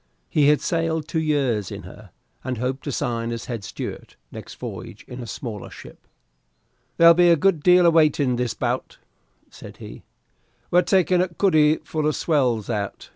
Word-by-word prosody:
He 145 Hz, -2 st, +3 dB
had 150 Hz, 0 st, +4 dB
sailed 165 Hz, -2 st, -1 dB
two 160 Hz, -, -2 dB
years 135 Hz, -10 st, 0 dB
in -, -, -7 dB
her, -, -, -13 dB, 0.3 s
and 130 Hz, -1 st, -3 dB
hoped 130 Hz, +3 st, -3 dB
to 145 Hz, -, -3 dB
sign 115 Hz, -2 st, -2 dB
as 115 Hz, 0 st, -5 dB
head 115 Hz, -5 st, -5 dB
steward 105 Hz, -, -7 dB, 0.2 s
next -, -, -10 dB
voyage -, -, -9 dB
in 125 Hz, 0 st, -8 dB
a 120 Hz, -, -8 dB
smaller 110 Hz, -2 st, -7 dB
ship. -, -, -14 dB, 0.9 s
"There'll 170 Hz, 0 st, +8 dB
be 175 Hz, +1 st, +4 dB
a 170 Hz, -, +6 dB
good 170 Hz, 0 st, +1 dB
deal 180 Hz, +2 st, +5 dB
of 170 Hz, -, +5 dB
waiting 150 Hz, -5 st, +3 dB
this 120 Hz, -1 st, -2 dB
bout," -, -, -3 dB, 0.5 s
said -, -, -12 dB
he; -, -, -11 dB, 0.7 s
"we're 180 Hz, -, +5 dB
taking 180 Hz, -1 st, +2 dB
a 185 Hz, -, +1 dB
cuddy 160 Hz, -4 st, +3 dB
full 155 Hz, 0 st, -2 dB
of 155 Hz, -, 0 dB
swells 125 Hz, -, 0 dB
out. 105 Hz, -4 st, -4 dB
150 Hz, 180 wpm, -22 LUFS, 120-165 Hz, 0.9 s, There'll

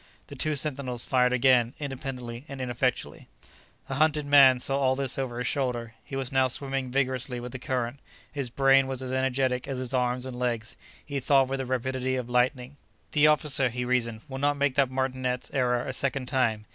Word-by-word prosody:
The -, -, -8 dB
two 155 Hz, -1 st, 0 dB
sentinels 130 Hz, -4 st, -1 dB
fired 125 Hz, -1 st, +3 dB
again, 125 Hz, -1 st, +3 dB
independently 130 Hz, -4 st, -6 dB
and 140 Hz, -3 st, -8 dB
ineffectually. 125 Hz, 0 st, -2 dB, 0.6 s
The -, -, -4 dB
hunted 155 Hz, -1 st, +2 dB
man 140 Hz, -3 st, +7 dB
saw 135 Hz, +2 st, 0 dB
all 130 Hz, -1 st, +2 dB
this 135 Hz, -1 st, -2 dB
over 125 Hz, -3 st, -3 dB
his 125 Hz, -, -3 dB
shoulder; 120 Hz, -4 st, -2 dB
he 135 Hz, -, -8 dB
was 135 Hz, -2 st, -2 dB
now 130 Hz, -1 st, +3 dB
swimming 135 Hz, 0 st, -3 dB
vigorously 130 Hz, -1 st, -1 dB
with 120 Hz, 0 st, -7 dB
the 130 Hz, -, -7 dB
current. 125 Hz, +1 st, -3 dB, 0.3 s
His 140 Hz, -3 st, -3 dB
brain 135 Hz, +1 st, +4 dB
was 130 Hz, -1 st, -4 dB
as 130 Hz, 0 st, -4 dB
energetic 130 Hz, -1 st, 0 dB
as 135 Hz, -2 st, -3 dB
his 130 Hz, 0 st, -4 dB
arms 125 Hz, 0 st, 0 dB
and 130 Hz, -1 st, -6 dB
legs; 120 Hz, -3 st, -2 dB, 0.3 s
he 140 Hz, -1 st, -3 dB
thought 135 Hz, 0 st, +3 dB
with 135 Hz, 0 st, -2 dB
the 130 Hz, -, -3 dB
rapidity 130 Hz, +1 st, -1 dB
of 125 Hz, -1 st, -4 dB
lightning: 125 Hz, +2 st, 0 dB, 0.3 s
"The 150 Hz, 0 st, +5 dB
officer," 150 Hz, -3 st, +3 dB
he 125 Hz, +1 st, -4 dB
reasoned, 115 Hz, -3 st, 0 dB
"will 135 Hz, -1 st, -6 dB
not 145 Hz, +1 st, +1 dB
make 140 Hz, -1 st, +1 dB
that 135 Hz, -1 st, +2 dB
martinet's 130 Hz, -1 st, -2 dB
error 125 Hz, -2 st, +1 dB
a -, -, -4 dB
second 135 Hz, 0 st, 0 dB
time. 120 Hz, -5 st, 0 dB
130 Hz, 195 wpm, -27 LUFS, 125-135 Hz, 0.6 s, man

